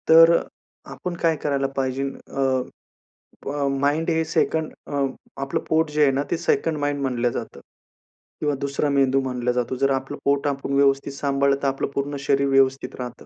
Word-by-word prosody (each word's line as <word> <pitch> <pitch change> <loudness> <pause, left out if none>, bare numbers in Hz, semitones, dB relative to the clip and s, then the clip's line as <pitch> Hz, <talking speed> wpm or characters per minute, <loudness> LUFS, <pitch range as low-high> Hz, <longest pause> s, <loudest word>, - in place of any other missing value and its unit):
तर 165 +1 +9 0.6
आपण 180 -1 -5
काय 165 -1 +3
करायला 140 -2 +1
पाहिजे. 135 0 -1
अ, 135 -1 -1 0.8
प 140 0 -1
माइंड 150 +4 +1
हे 160 -1 +2
2nd 160 0 0
अ, 140 -1 0 0.4
आपलं 135 0 -1
पोट 160 0 +2
जे 150 0 0
आहे 140 - +5
ना, 135 +1 0
ते - - +1
2nd 165 -1 0
माइंड 145 0 -1
म्हणलं 125 -3 0
जातं - - -6 0.8
किंवा 150 -1 +1
दुसरा 140 +1 0
मेंदू 135 -1 +3
मानला 125 -2 -1
जातो. 125 +1 -1
जर 135 +2 +1
आपलं 135 +2 -2
पोट 140 +1 +2
आपण 140 -1 -2
व्यवस्थित 140 0 +2
सांभाळलं, 140 0 +1
तर - - +2
आपलं 135 0 -1
पूर्ण 140 +1 -2
शरीर 140 0 +1
व्यवस्थित 135 0 +2
राहतं. 125 -1 -7
140 Hz, 170 wpm, -23 LUFS, 135-145 Hz, 0.8 s, तर